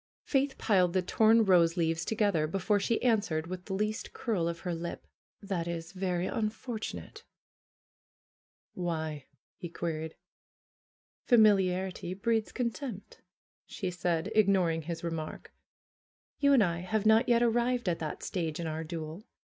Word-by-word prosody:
Faith 275 -1 0
piled 185 -5 +2
the 185 - +2
torn 220 +4 +4
rose 170 -3 +4
leaves 165 -1 +1
together 200 -7 +1
before 195 +4 +1
she 230 +3 0
answered 205 -10 +1
with 180 +1 -7
the 190 - -3
least 215 +3 -2
curl 205 -9 -1
of 170 0 -4
her 180 -2 -2
lip: 170 +1 -5 0.4
"That 185 -4 -2
is 170 0 -5
very 185 -2 -1
unfortunate 220 +2 -4 0.8
!" - - -80
"Why?'^ 160 -5 -3 0.3
he 175 - -7
queried. 160 -1 -4 1.1
"Familiarity 190 -5 +3
breeds 220 +2 0
contempt," 235 -3 -5 0.5
she 185 -3 -4
said, 175 +1 -1
ignoring 190 -6 +3
his 165 +1 -6
remark. 165 -2 -5 0.9
"You 280 -1 +4
and 250 -6 +6
I 170 -2 0
have 210 +4 -1
not 220 +3 +5
yet 240 0 +4
arrived 240 0 +1
at 170 -2 0
that 155 -2 -5
stage 165 -4 -3
in 170 - -3
our 160 0 -3
duel. 160 +1 -6
185 Hz, 140 wpm, -30 LUFS, 165-220 Hz, 1.1 s, and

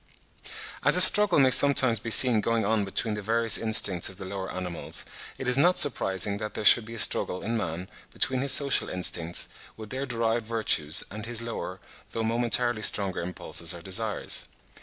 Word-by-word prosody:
As - - +3
a - - +2
struggle 205 +1 +8
may 135 -2 +2
sometimes 130 -5 +3
be 115 - -8
seen 115 +1 +6
going 115 -1 -3
on 110 0 -1
between 105 +3 -4
the 105 - -7
various 115 +2 +1
instincts 105 -5 +2
of 95 - -14
the 95 - -9
lower 95 0 -8
animals, 90 -2 -6 0.3
it 130 - -8
is 125 +2 +1
not 180 +5 +1
surprising 100 -7 0
that 105 -1 -8
there 105 - -6
should 110 +2 +4
be 115 +1 -11
a - - -10
struggle 90 -3 +1
in 115 +3 -5
man 90 -4 -6 0.2
between 130 -1 -2
his 140 0 0
social 140 0 +2
instincts, 85 -2 -2 0.3
with 110 -1 -12
their 135 +2 -6
derived 115 -2 -3
virtues, 95 -9 0
and 110 +2 -9
his 115 -1 -5
lower, 105 -5 -8 0.3
though 115 - -4
momentarily 120 0 -1
stronger 100 -3 0
impulses 85 -1 -3
or 85 - -12
desires. 105 +3 -3
110 Hz, 185 wpm, -24 LUFS, 95-120 Hz, 0.3 s, struggle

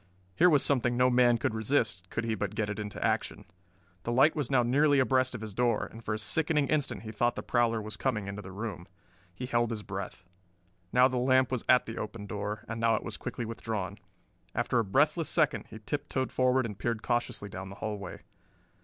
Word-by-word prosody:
Here 180 - +5
was 145 -4 +4
something 120 -3 +1
no 125 0 +4
man 120 -1 +5
could 120 +1 -1
resist 110 -5 0
could 115 - -2
he 115 -1 -1
but 105 0 -3
get 105 -1 -1
it 105 - -5
into 105 -2 -4
action. - - -1 0.6
The 120 - -3
light 135 +6 +5
was 145 -5 -1
now 130 -3 +4
nearly 145 +4 +4
abreast 130 -1 +2
of 115 - -6
his 110 -2 -6
door, 120 0 +1
and 115 +1 -11
for 105 - -1
a - - -2
sickening 150 +6 +1
instant 145 -5 0
he 110 - -6
thought 120 +2 +1
the - - -5
prowler 120 -2 +2
was 105 0 -6
coming 110 -7 -1
into 100 +1 -5
the 95 -1 -9
room. 100 -3 -6 0.4
He 115 +8 -6
held 120 -2 +1
his 110 -3 -4
breath. 95 -3 -6 0.7
Now 125 +2 +6
the 130 -1 -2
lamp 130 +1 +3
was 130 -3 -1
at 125 0 +6
the 115 - -6
open 105 0 -5
door, 105 +1 -4
and 115 0 -4
now 115 0 +4
it - - -3
was - - -5
quickly 120 - -5
withdrawn. 110 -4 -4 0.6
After 120 - +1
a - - +2
breathless 150 - +2
second 155 -3 +1
he 110 - -9
tip 140 +7 -4
toed 130 -1 -1
forward 130 0 +2
and 105 -3 -6
peered 115 -2 -2
cautiously 120 -3 -1
down 95 -1 -7
the 100 - -9
hallway. 105 -1 -5
115 Hz, 220 wpm, -30 LUFS, 105-130 Hz, 0.7 s, Now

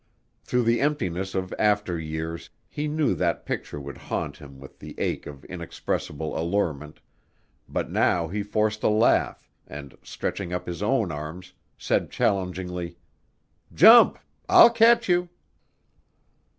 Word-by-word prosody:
Through 125 0 0
the 115 +1 +2
emptiness 95 - -1
of 95 -1 -3
after 105 -5 +1
years, 80 +1 -5 0.2
he 150 +1 -4
knew 150 0 +1
that - - -1
picture 75 - -4
would 70 0 -9
haunt - - -4
him 70 -2 -13
with 70 - -14
the - - -10
ache - - -2
of 70 -2 -11
inexpressible 80 +1 -4
allurement, 80 -4 -2 0.7
but - - -3
now 85 -2 +1
he 100 +5 -3
forced 105 +1 -1
a - - +2
laugh 110 +2 +2 0.2
and, 70 -1 -10
stretching 95 -3 -5
up 90 - -3
his 85 -2 -6
own - - +1
arms, 80 +5 -7 0.2
said - - 0
challengingly, 90 -2 -2 0.8
"Jump; - - +8 0.3
I'll 235 - +8
catch 235 0 +4
you." 175 -1 +1
90 Hz, 135 wpm, -25 LUFS, 80-110 Hz, 0.8 s, Jump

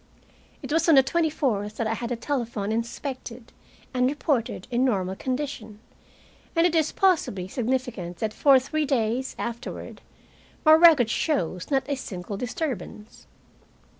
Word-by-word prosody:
It - - -4
was 325 +1 +2
on 320 - +7
the 270 - +7
twenty 325 +4 +1
fourth 215 -9 -2
that 230 - -1
I 220 - 0
had 235 +1 -4
the 245 - -1
telephone 230 -5 -3
inspected 235 +1 -5 0.4
and 250 0 +2
reported 275 - -1
in 245 +1 +2
normal 190 -7 0
condition, 255 -4 -4 0.8
and 330 +1 +4
it 350 - +2
is 315 -2 +2
possibly 315 - +1
significant 240 -6 -3
that 215 +1 -2
for 275 +2 +5
three 300 +3 -1
days 250 -1 0
afterward 235 +2 -6 0.6
my 310 - +8
record 315 -8 +7
shows 185 - -1
not 270 -2 +1
a 285 - -1
single 200 -7 -6
disturbance. 240 - -5
250 Hz, 145 wpm, -25 LUFS, 220-290 Hz, 0.8 s, my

